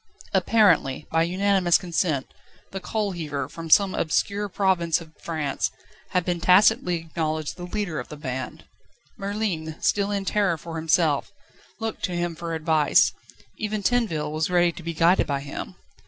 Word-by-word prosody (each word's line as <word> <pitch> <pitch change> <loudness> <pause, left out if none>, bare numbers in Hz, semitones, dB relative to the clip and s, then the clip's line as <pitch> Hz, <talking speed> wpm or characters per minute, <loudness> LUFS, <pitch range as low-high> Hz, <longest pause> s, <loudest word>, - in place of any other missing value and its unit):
Apparently, 170 -11 +3
by 165 - +3
unanimous 185 0 +3
consent, 165 -6 -1 0.5
the 195 - -4
coalheaver, 175 -10 -3
from 165 +2 -8
some 195 +3 +5
obscure 200 +5 0
province 175 -4 +1
of 160 -2 -14
France, 155 -4 -2 0.4
had 180 -2 0
been 175 -1 -1
tacitly 190 +1 +5
acknowledged 155 -2 -3
the 175 - -7
leader 195 -5 -3
of - - -6
the 150 - -9
band. 130 -3 -5 0.5
Merlin, 195 -6 -3
still 200 -1 +1
in 200 -1 -2
terror 200 -5 +1
for 165 +1 -7
himself, 160 -2 +1 0.5
looked 225 -1 -4
to 180 - -4
him 175 -1 -2
for 165 0 -4
advice; 155 -2 +3 0.5
even 215 -1 -2
Tinville 190 -11 0
was 155 +2 -1
ready 175 -1 +3
to 170 - -10
be 170 0 -5
guided 170 +3 +4
by 140 -1 -1
him. 140 0 -7
170 Hz, 155 wpm, -25 LUFS, 160-195 Hz, 0.5 s, some